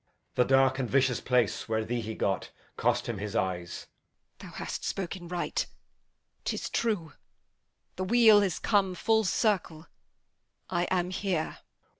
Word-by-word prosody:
The 125 - +3
dark 135 0 +4
and 125 -3 -1
vicious 130 -2 +2
place 120 -4 +1
where 110 0 0
thee 120 +1 -2
he 110 0 -5
got 95 - -1 0.3
Cost - - +1
him 115 -4 -3
his 105 +2 -5
eyes. 90 -4 -2 0.5
Edm. - - -10
Th' - - -14
hast - - -5
spoken 180 -2 -4
right; 175 0 -2 0.8
'tis - - -3
true. 200 -10 -1 0.8
The 185 - -1
wheel 220 -1 +7
is 195 -4 0
come 195 -4 +2
full 220 +3 +2
circle; 180 -5 0 0.9
I 175 -1 +1
am 180 0 0
here. 185 -4 -2
165 Hz, 145 wpm, -29 LUFS, 120-190 Hz, 0.9 s, wheel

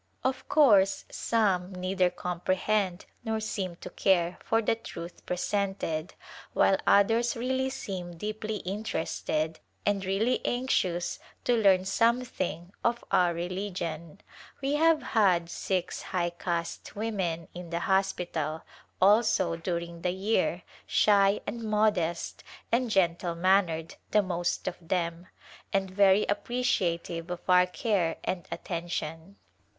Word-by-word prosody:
Of 260 0 -2
course 205 -11 +5
some 195 -5 +1
neither 185 0 +1
comprehend 185 +2 -1 0.2
nor 220 0 -1
seem 195 -5 -3
to - - -7
care 175 -3 +2
for 225 - +2
the 225 - +2
truth 175 -6 -8
presented, 180 -3 -2 0.4
while 195 - +4
others 225 +4 +4
really 260 +2 0
seem 185 -10 -6
deeply 215 +3 -4
interested 165 -5 -2 0.3
and 200 -1 +1
really 200 +6 +1
anxious 185 -9 0 0.2
to 245 - +3
learn 195 -4 +4
something 200 -6 0
of 235 0 +1
our 175 -2 +3
religion. 175 -1 -4 0.4
W> 275 +2 +1
have 325 -1 +4
had 180 -6 +2
six 185 -2 -2
high 175 -2 -1
caste 170 -1 -4
women 190 -7 -2
in 175 -1 -8
the 170 0 -2
hospital, 175 -5 0 0.4
also, 190 -3 +4
during 170 0 -4
the 180 - 0
year, 195 +5 0 0.2
shy 200 -1 +4
and 235 - -4
modest 210 -6 0 0.3
and 240 +1 +2
gentle 175 -3 +1
mannered 170 -3 +2 0.2
the 210 -1 +4
most 175 -2 -2
of 185 - -2
them, 170 0 -2 0.4
and 195 -1 0
very 195 +1 +5
appreci 205 -5 0
ative 165 0 -7
of 175 -1 -4
our 180 0 +6
care 180 -3 0
and 180 -2 -3
attention. 170 +1 -4
190 Hz, 125 wpm, -29 LUFS, 170-215 Hz, 0.4 s, our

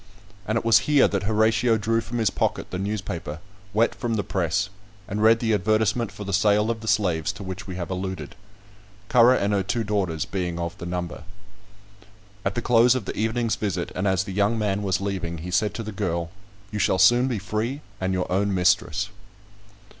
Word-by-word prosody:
And 110 +2 +1
it 115 - -3
was 115 - +6
here 145 -2 +6
that 100 -2 -1
Horatio 110 +2 +3
drew 115 +2 0
from 120 +2 -5
his 110 -4 +2
pocket - - -2
the 90 - -3
newspaper, 95 -6 -4 0.3
wet 110 +3 +2
from 120 -2 -2
the 105 - 0
press, 95 +1 -1 0.4
and 105 +1 -3
read 110 +1 +6
the 115 -2 +1
advertisement 110 +3 +1
for 105 - -8
the 100 -1 -4
sale 105 +3 +3
of 115 -1 -5
the 110 - -8
slaves 90 -5 +1
to 105 0 -9
which 95 +2 -6
we 95 - -5
have 90 0 -5
alluded; 95 -5 -4 0.8
Currer 125 +1 +6
and 100 -3 0
her 100 - +2
two 115 +5 -1
daughters 95 -7 -1
being 90 -3 -3
of 85 -1 -3
the 85 - -6
number. 90 -1 -4 1.2
At 100 - -1
the 120 - -2
close 120 +1 +5
of 125 -6 -3
the - - -4
evening's 115 +1 0
visit, 95 -5 -2
and 95 +2 -1
as 95 -1 +2
the 95 -1 -7
young 100 +4 +2
man 105 -2 0
was 95 -2 0
leaving, 95 -4 -3
he 90 +3 -6
said 105 +4 +1
to 115 - -4
the 110 - -6
girl, 85 -4 -2 0.4
"You 105 - -3
shall 95 - +2
soon 120 +7 +5
be 125 -4 -1
free 110 +8 -3 0.2
and 95 0 -1
your 90 -1 0
own 100 +1 +1
mistress." 90 +1 +2
100 Hz, 205 wpm, -24 LUFS, 95-110 Hz, 1.2 s, was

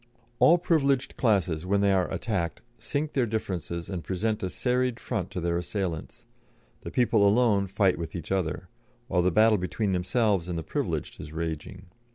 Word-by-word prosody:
All 170 - +7
privileged 140 -6 +1
classes, 95 -9 +1
when 100 +2 +1
they 100 -1 +4
are 95 -2 +1
attacked, 95 -8 -2 0.2
sink 145 +6 -3
their 130 -4 +1
differences 90 -6 -3
and 90 -4 -4
present 105 +6 -1
a 95 - -2
serried 125 +2 0
front - - -3
to - - -4
their 85 0 0
assailants; 90 -3 -4 0.6
the - - -6
people 115 -4 +3
alone 100 -1 +4
fight 95 -2 +2
with 85 +1 -5
each 85 -1 -6
other, 90 -1 -1 0.4
while 90 -8 +2
the 90 - +3
battle 110 +2 +5
between 95 +3 -1
themselves 95 0 +1
and 85 - -2
the 80 - -3
privileged - - -3
is 75 - -9
raging. 80 -1 -5
100 Hz, 175 wpm, -27 LUFS, 85-115 Hz, 0.6 s, All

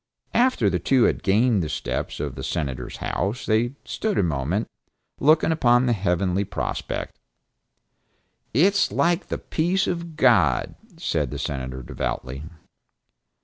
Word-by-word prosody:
After 245 - +3
the 90 -2 +1
two 125 - +3
had - - +2
gained 105 +2 +3
the 80 - -3
steps - - -3
of 70 -3 -3
the 65 - -8
Senator's 65 -5 -3
house 100 +8 -2
they 115 +3 +1
stood 215 -2 -2
a - - +3
moment, 80 - -1 0.5
looking 155 +3 +4
upon 125 -5 +4
the 120 -2 +2
lovely 90 +1 +1
prospect: 100 +1 -4 1.3
"It 170 - +4
is 200 - +2
like 175 +2 +1
the - - -2
peace 175 +4 0
of 170 -2 -4
God," 100 - +3 0.2
said - - -1
the - - -5
Senator 65 -2 -4
devoutly. 65 +2 -4
110 Hz, 140 wpm, -24 LUFS, -, 1.3 s, looking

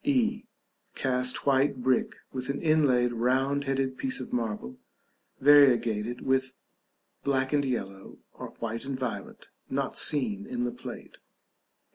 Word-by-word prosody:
e. 240 -5 +1 0.5
Cast 125 -1 +1
white 140 +1 +3
brick, 130 0 +1 0.2
with 130 0 -4
an 140 - -1
inlaid 135 -6 +3
round 130 +4 +1
headed 135 -1 -1
piece 265 -1 -1
of - - -8
marble, 105 - -3 0.6
variegated 120 -5 +4
with 130 0 0 0.7
black 135 0 0
and 145 -1 +3
yellow, 100 -7 -4 0.2
or - - -8
white 115 0 -4
and 135 -1 -4
violet 130 -3 -5 0.2
(not - - -2
seen 205 +7 +1
in 245 0 -3
the 245 - -1
plate). 245 - -10
130 Hz, 130 wpm, -28 LUFS, 125-145 Hz, 0.7 s, variegated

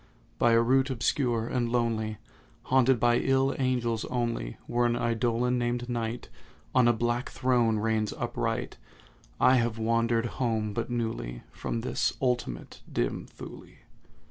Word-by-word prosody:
By 120 -1 +4
a 115 - +5
route 130 +3 +3
obscure 120 -2 0
and 120 -1 -1
lonely, 110 -3 0 0.5
Haunted 130 -1 +3
by 120 +1 +4
ill 135 0 +2
angels 120 -4 0
only, 115 - -2
Where 120 0 +1
an 120 - +1
Eidolon, 120 +1 +1
named 120 0 -1
NIGHT, 120 0 -3 0.5
On 125 -2 +5
a - - +6
black 120 +2 -1
throne 120 -3 +2
reigns 110 0 0
upright, - - -3 0.6
I 130 +1 +6
have 115 -2 0
wandered 115 +1 +1 0.2
home 110 -4 0
but 115 +3 -3
newly 60 - -3
From 115 - -3
this 120 - -1
ultimate 125 - -2
dim - - -2
Thule. - - -11
120 Hz, 140 wpm, -28 LUFS, 115-125 Hz, 0.6 s, a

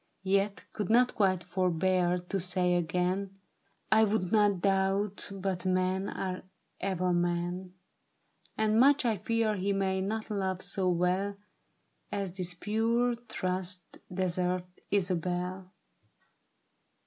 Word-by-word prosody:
Yet 195 +1 +1
could 210 -4 -3
not 245 +2 +4
quite 190 -4 +2
forbear 180 0 +1
to 180 +2 -3
say 180 0 +1
again, 180 +3 0 0.3
' - - -41
I 220 0 +6
would 205 -4 +1
not 205 -3 +4
doubt, 195 +1 0
but 190 -2 -3
men 185 +1 +1
are 185 -1 -3 0.4
ever 185 -2 0
men, 175 +1 -1 0.8
And 220 0 +3
much 275 +1 +5
I 225 -3 +2
fear 225 +1 0
he 195 +2 0
may 190 -1 0
not 215 +3 -3
love 190 -2 -1
so 185 -2 0
well 180 +3 +1 0.7
As 200 -2 -2
this 180 -1 -3
pure 230 +5 +1
trust 185 -6 -4
deserveth, 180 0 0 0.2
Isabel.' 180 -1 -1
190 Hz, 120 wpm, -30 LUFS, 180-205 Hz, 0.8 s, I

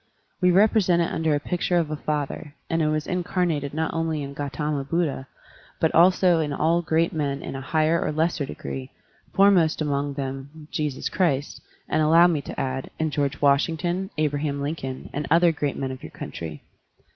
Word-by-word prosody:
We 180 - +5
represent 190 -2 +4
it - - -2
under 160 -2 +1
a - - 0
picture 175 +3 0
of 160 -3 0
a - - -1
father, 150 0 -3 0.2
and 165 0 +1
it 155 - +2
was 155 0 0
incarnated 175 -5 -1
not 160 +2 -2
only 160 -2 -1
in 140 0 -6
Gautama 145 +1 -2
Buddha, 145 -3 -1 0.5
but 160 - +2
also 180 0 +5
in 150 -2 -1
all 165 +4 +2
great 165 0 +1
men 140 -3 -2
in - - -5
a 135 - -5
higher 155 +4 +1
or - - -1
lesser 160 0 0
degree, 70 - -6 0.5
foremost 195 -5 +4
among 145 -2 -1
them 135 0 -4
in 155 -1 -12
Jesus 150 -3 -2
Christ, 150 -7 0 0.3
and, 155 - +1
allow 165 +3 +6
me 165 -5 +2
to - - -7
add, 130 0 -3
in 160 -1 -1
George 140 -1 -1
Washington, 165 +6 +1
Abraham 145 -1 0
Lincoln, 140 -3 -4
and 145 0 -3
other 170 +2 +5
great 145 -3 -2
men 135 -1 -2
of 130 - -8
your - - -8
cotintry. 80 -3 -7
155 Hz, 185 wpm, -24 LUFS, 140-165 Hz, 0.5 s, allow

